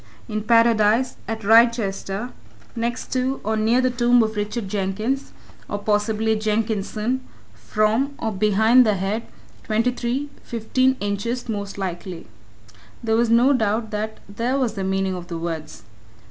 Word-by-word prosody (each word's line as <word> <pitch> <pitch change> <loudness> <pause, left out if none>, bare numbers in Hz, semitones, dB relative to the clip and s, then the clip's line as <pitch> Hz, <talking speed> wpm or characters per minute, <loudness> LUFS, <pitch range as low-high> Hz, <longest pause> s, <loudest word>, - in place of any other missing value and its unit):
In 215 -2 -2
Paradise, 230 +1 +3
at 220 0 -4
Wrychester, 225 -1 +3 0.4
next 235 +1 -3
to, 260 +1 0
or 220 +2 0
near, 225 +4 +3
the 255 0 +2
tomb 240 -1 +4
of 220 0 -2
Richard 210 +1 -3
Jenkins, 210 +7 -2 0.4
or, 205 - -2
possibly, 210 +1 +1
Jenkinson, 215 +2 -1 0.3
from, 225 +6 0
or 220 - -2
behind, 215 +5 +4
the 215 -3 +2
head, 195 +4 -2 0.4
twenty 225 +3 +1
three, 250 +4 -3
fifteen 255 +3 0
inches, 205 +5 -2
most 205 -3 -4
likely. 180 -2 -5 0.8
There 220 -1 +1
was 235 0 +2
no 240 +5 +5
doubt 220 -2 0
that 215 +1 -3
there 235 +6 -1
was 250 -5 0
the 195 -3 -4
meaning 190 0 0
of 175 -1 -6
the 170 - -5
words. 165 -2 -5
220 Hz, 145 wpm, -22 LUFS, 205-240 Hz, 0.8 s, no